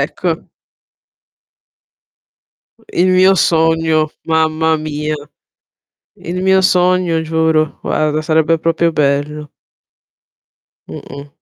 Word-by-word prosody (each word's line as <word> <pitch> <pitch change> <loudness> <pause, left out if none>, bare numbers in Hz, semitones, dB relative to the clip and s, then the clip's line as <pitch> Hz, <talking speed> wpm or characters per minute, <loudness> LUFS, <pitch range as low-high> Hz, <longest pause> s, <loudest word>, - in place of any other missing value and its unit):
Ecco. - - -2 2.6
Il 180 +2 +2
mio 185 +1 +5
sogno, 160 -2 +1
mamma 160 0 +1
mia. 155 0 -4 1.0
Il 180 +2 -6
mio 190 0 +3
sogno 180 -3 +2
giuro, 160 -1 0
guarda 155 0 -1
sarebbe 160 +1 +1
proprio 165 +1 0
bello. 150 0 -1 1.4
Mh-mh. 140 +1 -10
160 Hz, 80 wpm, -15 LUFS, 155-170 Hz, 2.6 s, mio